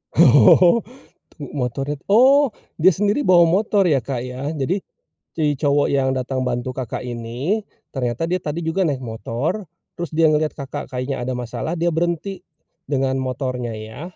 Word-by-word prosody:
Oh, 185 +6 +6 0.6
tuh 145 -4 -8
motornya 135 +2 -3
tu - - -35
oh, 260 +8 +6 0.3
dia 180 +3 +5
sendiri 205 - 0
bawa 175 -2 +6
motor 200 +4 +3
ya, 140 - +4
Kak, 125 0 -4
ya? 130 +2 -6
Jadi 155 +7 -1 0.6
si 160 - -1
cowok 145 0 +2
yang 135 -1 +2
datang 130 0 -2
bantu 125 +1 -2
Kakak 130 -4 -4
ini 125 - -3 0.3
ternyata 125 +4 -2
dia 180 - +1
tadi 155 -1 -4
juga 165 +3 0
naik 140 -4 -2
motor, 125 - -3 0.3
terus 175 - -4
dia 160 0 +4
ngelihat 155 0 +1
Kakak 135 -3 -6
kayaknya 130 +2 -3
ada 130 +1 -2
masalah, 125 +7 -4
dia 170 0 0
berhenti 175 +4 -2 0.5
dengan 135 -1 0
motornya 130 -2 -3
ya? 110 +5 -8
140 Hz, 160 wpm, -21 LUFS, 125-170 Hz, 0.6 s, Oh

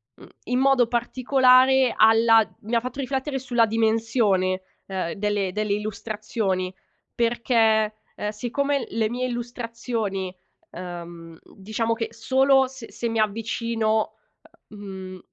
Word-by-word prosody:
mhmm, - - -15 0.2
in 250 - 0
modo 265 -3 +4
particolare 255 +1 +4
alla 225 0 +6 0.2
mi 220 +3 -7
ha - - +5
fatto 255 +3 -7
riflettere 270 +1 -2
sulla 245 -3 +2
dimensione, 220 -4 +1 0.3
ehm, 185 -3 -3
delle 205 -2 -1
delle 210 0 -1
illustrazioni 210 -2 -3 0.4
perché, 230 -2 +2 0.2
ehm, 210 - -3
siccome 250 +4 -1
le 220 -1 0
mie 250 +1 -2
illustrazioni, 230 -5 -4 0.4
uhm, 170 -2 -8 0.2
diciamo 220 +3 -2
che 225 -1 -3
solo 265 +3 +3
s 255 -3 -11
se 235 - -4
mi 225 0 -1
avvicino, 220 0 0 0.6
uhm, 210 - -12
mhmm, 190 -2 -8
225 Hz, 120 wpm, -24 LUFS, 205-245 Hz, 0.6 s, alla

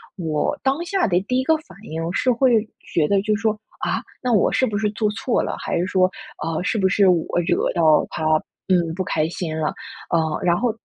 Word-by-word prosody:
我 160 -5 -1
当 270 +4 +1
下 385 - +1
的 175 -3 +2
第 250 +6 -1
一 - - 0
个 320 +4 +3
反 195 - -16
应 165 -2 -4
是 255 +4 +2
会 235 -3 +3 0.3
觉 160 - +3
得 200 +2 +2
就 215 +1 +1
是 210 - -5
说： 220 -1 +3 0.3
“啊？ - - 0 0.2
那 250 - +1
我 210 -5 +3
是 260 - +3
不 210 -4 -2
是 210 0 +1
做 215 0 0
错 225 +3 0
了？ - - -3
还 - - -2
是 175 - +1
说， 185 -1 +3 0.3
啊， 165 0 -2
是 220 - 0
不 190 -3 +3
是 195 +1 +3
我 175 -3 +3 0.2
惹 - - +1
到 160 -3 +4
他， - - -5 0.5
嗯， 170 -3 +2
不 185 - -1
开 155 -3 0
心 165 -2 -4
了。” 155 - 0 0.4
啊， 160 -2 +1
然 175 -1 +2
后 245 +2 +1
190 Hz, 245 characters per minute, -22 LUFS, 170-225 Hz, 0.5 s, 到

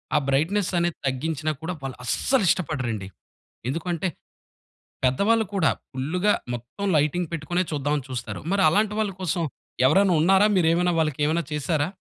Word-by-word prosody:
ఆ - - +6
బ్రైట్‌నెస్ 175 +9 +1
అనేది 170 -1 0
తగ్గించినా 155 +3 -1
కూడా 165 +3 -3
వాళ్ళస్సలు 135 - 0
ఇష్టపడరండి. 125 - -1 0.6
ఎందుకంటే 170 +4 -2 1.0
పెద్దవాళ్ళు 205 - +3
కూడా 175 -5 +3 0.2
ఫుల్లుగా 180 +10 +1 0.2
మొత్తం 120 - -6
లైటింగ్ 155 +3 +1
పెట్టుకునే 165 +3 -1
చూద్దామని 145 -1 -1
చూస్తారు. 120 -2 -5
మరి 200 -1 +3
అలాంటి 210 +5 +2
వాళ్ళు 210 -3 0
కోసం 175 -1 -1 0.5
ఎవరైనా 190 +4 +4
ఉన్నారా? 195 +4 +5
మీరేమైనా 175 +1 +3
వాళ్ళకేమైనా 155 +2 +1
చేసారా? 150 +1 0
160 Hz, 125 wpm, -24 LUFS, 145-185 Hz, 1.0 s, ఆ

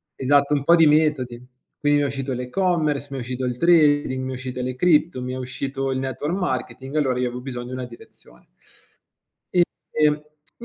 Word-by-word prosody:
esatto, 140 +2 +3
un 140 - -1
po' 170 +4 +6
di 165 -2 +6
metodi, 140 -6 +1 0.3
quindi 145 0 +2
mi 145 - +1
è - - +1
uscito 135 -1 -3
l'e-commerce, 150 +2 0
mi 135 - -4
è - - -3
uscito 125 +1 -4
il 125 -1 -2
trading, 145 -5 +3
mi 130 - -4
è - - -4
uscito 125 0 -5
le 125 0 -3
cripto, 160 -2 +2
mi 125 0 -4
è 130 - -4
uscito 135 +1 -3
il 130 - -1
network 135 +4 -3
marketing, 130 -5 -3
allora 130 -4 +1
io 125 - +1
avevo 125 +1 -6
bisogno 125 -2 -6
di 130 - -7
una 130 -1 -4
direzione. 115 - -16 1.5
E 155 -1 +3
e 150 +6 -7
135 Hz, 195 wpm, -23 LUFS, 125-150 Hz, 1.5 s, po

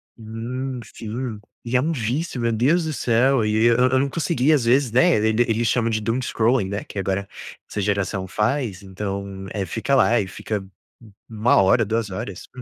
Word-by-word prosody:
Hum, 120 +4 -5
sim, 110 +1 -6 0.2
e 120 +2 -3
é 125 - +4
um 160 +5 0
vício, 130 +1 -2
meu 115 0 +1
Deus 140 +10 +2
do 155 - -2
céu 125 -1 +2
e 110 +1 +2
eu 120 0 +5
eu 130 +1 +3
não 140 +1 0
consegui, 145 -2 +1
às 145 -6 +3
vezes, 125 +1 +3
né. 130 +5 +4
E 110 - +1
eles 115 +1 +1
chamam 115 -1 +1
de 110 -1 -1
doom 115 +4 -1
scrolling, 115 -4 +1
né. 100 +1 -3
Que - - -11
agora 95 0 -1 0.4
essa - - -4
geração 100 -1 -1
faz, 105 0 -1
então 100 0 -5
é, 100 -2 -2
fica 115 +9 -2
lá 120 -2 +4
e 100 - -2
fica 100 +1 -4 0.6
1 110 +2 +2
hora, 105 +4 +4
2 110 0 -1
horas. 95 0 -6
115 Hz, 190 wpm, -22 LUFS, 105-130 Hz, 0.6 s, eu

